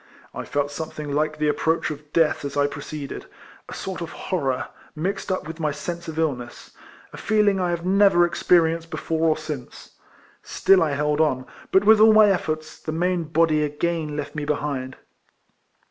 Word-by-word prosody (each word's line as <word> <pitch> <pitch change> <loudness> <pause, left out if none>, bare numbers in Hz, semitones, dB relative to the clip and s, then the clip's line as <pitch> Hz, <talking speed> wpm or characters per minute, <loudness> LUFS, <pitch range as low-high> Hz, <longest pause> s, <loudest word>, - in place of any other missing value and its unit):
I - - -6
felt 145 0 -1
something 150 0 -6
like 155 +1 0
the 150 0 0
ap 150 - +1
proach 160 -1 0
of 150 0 -10
death 160 -2 +2
as 140 0 -5
I 145 - +3
proceeded 145 0 -6 0.2
— - - -22
a - - -7
sort 190 -2 -5
of 170 - -4
horror, 135 -8 -2 0.3
mixed 190 +5 -3
up 185 - -2
with 165 +1 -8
my 155 -2 0
sense 170 +4 -5
of 160 -1 -6
illness 130 -7 -3 0.2
— - - -24
a - - -9
leeling 210 -2 +3
I 180 -1 0
have 170 0 -3
never 195 -2 +5
experienced 165 -1 +2
before 160 0 0
or 155 - +2
since. 155 -5 -8 0.5
Still 195 -1 +3
I 155 -3 +1
held 150 +1 +1
on; 130 -5 +1 0.3
but 190 - +4
with 220 +1 +6
all 220 0 +7
my 215 -1 +7
efforts, 155 -4 -3
the 155 - -5
main 175 +1 0
body 155 -1 +2
again 150 +1 -2
left 145 -1 -5
me 150 - -4
behind. 145 -3 -3
160 Hz, 190 wpm, -23 LUFS, 150-175 Hz, 0.5 s, all